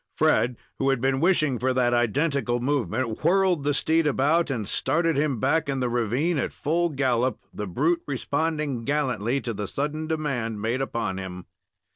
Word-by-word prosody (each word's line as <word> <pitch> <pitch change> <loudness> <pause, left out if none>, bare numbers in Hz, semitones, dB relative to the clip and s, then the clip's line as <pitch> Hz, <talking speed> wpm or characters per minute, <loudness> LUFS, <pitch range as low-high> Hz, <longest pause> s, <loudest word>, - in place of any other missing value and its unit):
Fred, 120 0 +2 0.2
who 135 - +2
had 135 -2 +2
been 135 +1 +1
washing 155 -6 +2
for 130 +1 0
that 120 -1 +2
identical 120 +1 +1
movement, 130 -3 -1
whirled 180 -2 +3
the 145 - +1
steed 160 +2 +2
about 150 +4 +2
and 115 -7 -2
started 165 +7 +1
him 140 -4 0
back 160 +5 +1
in 135 -1 -1
the 125 -1 0
ravine 125 +8 0
at - - -2
full 170 +3 0
gallop, 130 -3 0
the 105 - -5
brute 155 - +1
responding 145 -1 -1
gallantly 130 -3 0
to 115 - -3
the 105 -1 -4
sudden 150 +6 -3
demand 135 -9 -2
made 115 +5 -1
upon 110 -7 -2
him. 90 -1 -7
135 Hz, 170 wpm, -25 LUFS, 120-155 Hz, 0.2 s, whirled